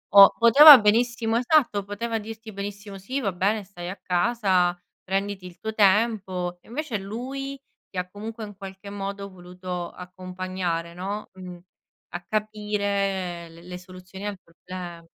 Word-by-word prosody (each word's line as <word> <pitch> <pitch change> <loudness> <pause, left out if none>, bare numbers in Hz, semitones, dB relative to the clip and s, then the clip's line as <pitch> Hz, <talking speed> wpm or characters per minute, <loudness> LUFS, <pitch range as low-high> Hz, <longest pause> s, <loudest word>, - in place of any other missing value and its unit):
o 200 0 +11
poteva 280 +6 +11
benissimo 225 +1 +2
esatto, 245 -6 +2
poteva 225 +3 -3
dirti 220 +1 -9
benissimo 200 0 -7
sì, 255 +9 -3
va 200 -6 0
bene, 200 +4 0
stai 180 -2 -8
a 195 - -5
casa, 180 -2 +1 0.3
prenditi 195 0 -2
il 175 -1 -11
tuo 220 0 -4
tempo. 195 -4 +2
Invece 265 -1 -4
lui 265 +7 -6 0.3
ti 190 - -10
ha 180 0 -2
comunque 220 +3 -7
in 205 -1 -8
qualche 195 0 -9
modo 200 0 -5
voluto 180 -1 -7
accompagnare, 185 -2 -5
no, 195 +4 -5
mh, 180 -1 -9 0.6
a 175 - -4
capire 200 -4 -2
l 170 +2 -15
le 180 - -6
soluzioni 185 +2 -10
al 205 -2 -4
problema. 175 0 -9
200 Hz, 140 wpm, -25 LUFS, 180-215 Hz, 0.6 s, o